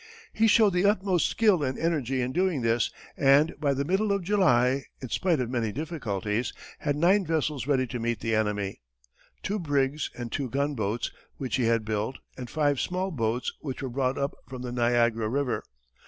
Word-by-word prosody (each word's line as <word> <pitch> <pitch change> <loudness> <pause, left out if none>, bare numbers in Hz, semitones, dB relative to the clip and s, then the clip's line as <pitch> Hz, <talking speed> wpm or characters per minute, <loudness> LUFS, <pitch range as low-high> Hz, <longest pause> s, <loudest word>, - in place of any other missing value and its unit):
He 225 +1 +3
showed 215 -2 +5
the 180 +2 +2
utmost 190 -3 +2
skill 210 -7 +3
and 130 -2 -1
energy 135 -6 0
in 125 - -2
doing 175 -5 +1
this, 115 0 +2 0.3
and 140 +3 +4
by 140 -3 +1
the 140 +1 -1
middle 195 +5 +1
of 200 -2 0
July, 140 -9 +3
in 130 - -7
spite 170 +1 +1
of 125 - -1
many 115 -4 0
difficulties, 120 - -2 0.3
had 145 -1 0
nine 185 +7 +4
vessels 155 -5 -1
ready 135 -3 +2
to 125 0 -5
meet 115 0 -1
the 115 - -1
enemy 105 - -1 0.6
two 210 +2 -1
brigs 145 -2 0
and 120 -2 -5
two 135 -3 -2
gunboats 120 -5 -1 0.3
which 125 -6 -2
he 125 - +1
had 115 -1 +2
built, 110 +4 -2 0.2
and 125 -2 -7
five 145 -1 +1
small 185 +1 -1
boats 120 -4 -1
which 140 -2 -5
were 130 - -2
brought 130 +1 0
up 140 0 -1
from 130 -1 -7
the 125 - -4
Niagara 120 -2 +2
river. 135 +1 -1
135 Hz, 185 wpm, -27 LUFS, 120-165 Hz, 0.6 s, showed